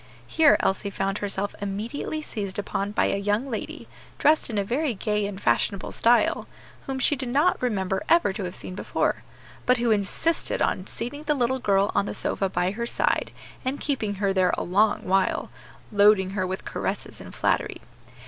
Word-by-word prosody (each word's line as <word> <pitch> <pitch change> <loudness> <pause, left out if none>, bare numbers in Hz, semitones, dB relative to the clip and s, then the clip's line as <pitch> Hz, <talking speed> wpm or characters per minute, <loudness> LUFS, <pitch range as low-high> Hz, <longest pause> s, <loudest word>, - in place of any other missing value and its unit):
Here 315 -3 +5
Elsie 195 +1 0
found 195 0 -2
herself 205 0 -2
immediately 220 +10 -3
seized 200 -9 -4
upon 200 0 -2
by - - +2
a - - +1
young 205 +5 0
lady, 235 -6 -5 0.3
dressed 305 -1 +3
in 225 - -4
very 250 +4 -1
gay 210 +1 -1
and 200 -1 -6
fashionable 185 +8 +1
style, 240 +1 +3 0.4
whom 270 -1 -2
she 265 +3 +3
did 260 -2 -4
not 295 +8 +2
remember 190 -6 0
ever 335 - +4
to 195 - -4
have 180 - -5
seen - - -6
before, 185 - -1 0.5
but 250 0 +5
who 235 -1 +1
insisted 215 +11 0
on 185 - 0
seating 245 +6 -5
the 300 -1 +2
little 260 0 +1
girl 200 -4 +2
on 200 0 +1
the - - -4
sofa 195 - 0
by 180 +1 0
her 235 +3 -3
side, - - +1 0.3
and 265 +2 -2
keeping 225 -8 -1
her 195 0 0
there 185 -1 +3
a - - -2
long 205 +4 +2
while, 190 0 +1 0.4
loading 205 -2 +5
her 185 -2 -1
with 190 +1 -5
caresses - - -4
and - - -11
flattery. - - 0
205 Hz, 180 wpm, -25 LUFS, 195-250 Hz, 0.5 s, Here